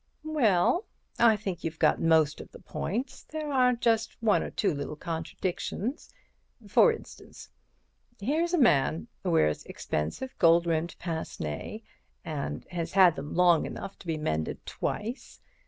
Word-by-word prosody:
"Well, 290 - +2 0.3
I 230 -2 +6
think 195 -4 -5
you've 165 0 -3
got - - +3
most 160 -2 +3
of - - -13
the - - -11
points. 235 - -4
There 305 -2 -5
are 250 -1 +4
just 230 -2 0
one 220 -2 +3
or - - -4
two 195 -5 0
little 145 +1 -4
contradictions. 175 - -4 0.6
For - - +6
instance, 455 - -10 0.7
here's 320 - +1
a - - +1
man 135 - +3
wears 75 -1 +2
expensive 80 - -4
gold 170 0 +5
rimmed 165 0 -1
pince 165 -2 -5
nez 75 - -5 0.4
and 150 -3 -4
has 170 -2 -3
had 185 -4 +6
them 145 +1 -6
long 175 -2 +4
enough 195 - -7
to - - -13
be 160 -1 -1
mended 80 - -2
twice. 230 +5 -4
175 Hz, 145 wpm, -28 LUFS, 155-235 Hz, 0.7 s, I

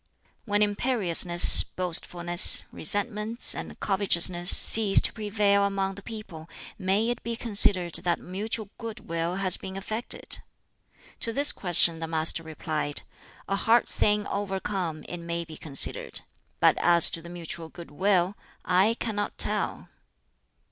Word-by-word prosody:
"When 205 -1 +1
imperiousness, 200 -6 +3
boastfulness, 175 -1 +1
resentments, 210 +5 +1
and - - -9
covetousness 180 -3 +2
cease 215 -3 +6
to - - +2
prevail 205 -2 0
among 195 -1 -2
the 200 - -12
people, 195 -7 -11 0.3
may 195 +4 0
it 240 - -6
be 235 0 -5
considered 200 -6 +3
that 175 -2 -2
mutual 210 +3 -6
good 230 -2 -8
will 165 +1 -3
has 190 -1 +3
been 190 0 -9
effected?" 215 +4 -4 0.8
To 230 - -5
this 285 +5 +2
question 175 -2 -1
the 165 - -5
Master 160 0 +1
replied, 155 -2 -5 0.4
"A 195 - -2
hard 230 +4 +1
thing 210 0 -1
overcome, 190 -5 -5
it 175 - -7
may 170 0 -5
be 160 -1 -12
considered. 145 -3 0 0.4
But - - +3
as 170 -1 +4
to 165 - -5
the 170 - -12
mutual 170 -1 -6
good 170 -1 -13
will 185 +3 0 0.3
I 190 +5 +2
cannot 210 -3 -5
tell." - - +2
190 Hz, 135 wpm, -25 LUFS, 170-210 Hz, 0.8 s, cease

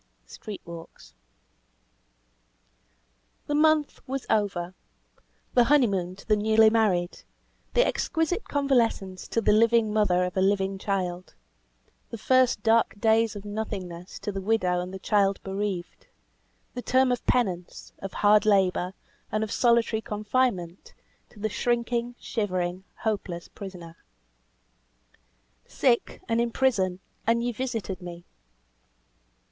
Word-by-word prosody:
"STREET 205 - -9
WALKS." 165 - -11 2.3
The 295 - -3
month 305 0 +3
was 270 0 -4
over; 190 -4 0 0.8
the 245 - +5
honeymoon 200 -11 +2
to 195 - -16
the 215 - +4
newly 220 +1 +4
married; 190 -6 +1 0.5
the - - +5
exquisite 325 +4 -1
convalescence 235 -10 0
to 230 - 0
the - - +3
"living 225 0 +4
mother 185 -4 +3
of 180 - -5
a 190 - +1
living 195 0 +1
child;" 185 -3 -3 0.7
the 230 - -6
"first 255 -1 +2
dark 225 -2 +2
days 225 0 +3
of 205 0 -8
nothingness" 190 -4 -5
to 205 - -3
the 195 -1 -4
widow 185 -4 +1
and 180 +1 -6
the 190 - -6
child 195 0 +1
bereaved; 195 -2 -4 0.7
the 250 - -5
term 260 +1 +3
of 245 - -1
penance, 185 -8 -1
of 195 - -6
hard 210 0 +4
labour, 190 -3 +2 0.4
and 215 +1 0
solitary 235 -2 +2
confinement, 210 -5 -2 0.3
to - - -21
the 215 - 0
shrinking, 235 +2 -1
shivering, 185 -4 -2 0.2
hopeless 195 -6 -3
prisoner. 175 -4 -10 1.7
"Sick, 245 -3 0
and 230 0 +1
in 235 - 0
prison, 195 -8 +1 0.3
and 235 +1 +2
ye 245 - 0
visited 225 -6 -4
me." 175 -1 -9
210 Hz, 120 wpm, -26 LUFS, 185-235 Hz, 2.3 s, the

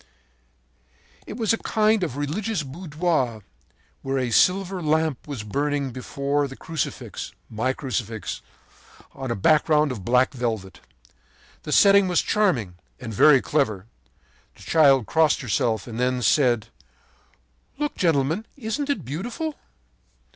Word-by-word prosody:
“It 210 - -7
was 225 -1 +1
a 225 - -1
kind 215 -1 +2
of 145 -6 -3
religious 170 +6 -2
boudoir 150 - -2 0.6
where 135 0 -2
a 125 -2 -1
silver 185 - +2
lamp 155 -3 0
was 135 -7 -5
burning 140 +4 -1
before 140 +3 -2
the 135 - -10
Crucifix, 160 0 -5 0.2
my 115 +4 0
Crucifix, 115 -5 -4 0.7
on 135 -1 -6
a 115 - -1
background 150 +5 +3
of 110 -7 -6
black 125 +5 +2
velvet. 110 -7 -4 0.8
The - - -7
setting 200 -1 +6
was 180 -2 +2
charming 135 - 0 0.2
and 115 -3 -7
very 135 +5 +6
clever. 110 -10 0 0.7
The - - -15
child 140 -6 +4
crossed 160 +2 +2
herself 115 -3 0
and 115 -1 -7
then 125 0 0
said: 120 -3 +2 1.1
“'Look, 295 +1 -2
gentlemen. 160 +4 +1
Isn't 275 +4 -3
it 285 - -1
beautiful?' 235 - -4
145 Hz, 125 wpm, -24 LUFS, 125-175 Hz, 1.1 s, setting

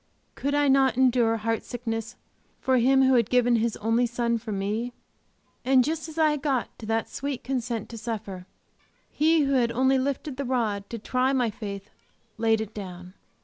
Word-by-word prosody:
Could 285 +1 -2
I 290 0 +3
not 270 -2 +4
endure 245 -3 +3
heart 225 +1 -1
sickness 225 -1 -5 0.4
for 260 -1 +2
Him 265 +3 +4
who 260 0 +4
had 235 -4 +3
given 245 -1 +3
His 225 0 -1
only 225 +3 +1
Son 235 0 -1
for 220 -1 -7
me! 210 +5 -2 0.7
And 260 0 +4
just 315 +3 -3
as 315 - -11
I 310 -2 +3
got 270 -4 -2
to 220 - -8
that 225 0 0
sweet 275 -2 -5
consent 245 -4 -3
to 230 - -8
suffer, 205 -5 -6 0.6
He 320 +1 +3
who 275 -1 +1
had 240 -3 +2
only 260 +2 +2
lifted 275 +1 -3
the 280 - -2
rod 220 -6 -1
to 230 - -5
try 255 +4 0
my 245 -4 +1
faith 200 -3 -7 0.5
laid 225 -1 +2
it 220 0 -6
down. 180 -3 -8
240 Hz, 185 wpm, -26 LUFS, 225-265 Hz, 0.7 s, not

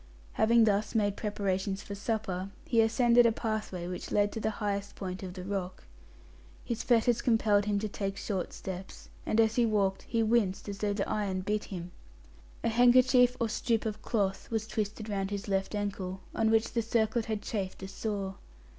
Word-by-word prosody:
Having 230 +1 +5
thus 210 +1 +1
made 205 -2 +2
preparations 195 -1 -2
for 200 - -7
supper, 200 -3 -2 0.2
he 240 -8 +3
ascended 235 +1 +5
a - - +3
pathway 215 -6 -3
which 180 0 -5
led 205 0 +2
to - - -4
the 220 - 0
highest 200 -1 -2
point 185 -1 -5
of 185 -1 -7
the 180 - -6
rock. 190 -1 -4 0.8
His 235 - -2
fetters 235 -1 +3
compelled 215 -4 +3
him 205 -1 +1
to 215 +2 -1
take 195 -1 -4
short 190 -4 -3
steps, 190 0 -8 0.2
and, 220 - +2
as 225 +1 +3
he 240 - +5
walked, 200 -3 +1
he 230 -1 +2
winced 215 -4 +1
as 200 -1 -5
though 205 -1 0
the 200 -1 -1
iron 195 -3 -1
bit 210 +2 -1
him. 180 -2 -7 0.7
A - - +2
handkerchief 245 +1 +5
or 230 - +1
strip 225 +1 0
of 215 0 -3
cloth 200 -5 -1
was 225 -2 -1
twisted 215 0 -3
round 195 -2 -2
his 205 0 -4
left 195 +1 -1
ankle; 195 -2 -3
on 220 0 +2
which 225 0 +2
the 235 - +2
circlet 225 0 +1
had 215 -2 -3
chafed 190 -3 -4
a - - -4
sore. 195 -1 -4
210 Hz, 190 wpm, -30 LUFS, 195-225 Hz, 0.8 s, Having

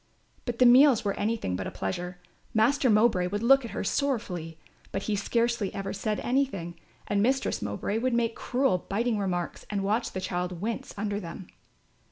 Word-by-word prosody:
But 240 -2 -3
the 250 - +5
meals 250 -1 +7
were 200 - +1
anything 215 - -1
but 95 0 -3
a - - -3
pleasure. 180 - -4 0.4
Master 250 +4 +3
Mowbray 210 -4 +4
would 205 +4 -3
look 270 +2 +6
at 235 - -6
her - - -4
sorrowfully, 195 - -2 0.3
but 195 - -3
he 215 - 0
scarcely 230 0 0
ever 195 0 -3
said 210 +2 -2
anything, 200 -11 -1 0.3
and 205 -1 +1
Mistress 265 +5 +1
Mowbray 105 - -2
would 250 0 0
make 230 -1 +1
cruel 250 -8 +1
biting 225 +2 0
remarks 180 -3 -2
and 200 -2 -1
watch 215 +4 0
the 185 - -2
child 180 -1 -3
wince 225 +4 -3
under 205 0 -2
them. 175 0 -8
210 Hz, 180 wpm, -28 LUFS, 185-235 Hz, 0.4 s, meals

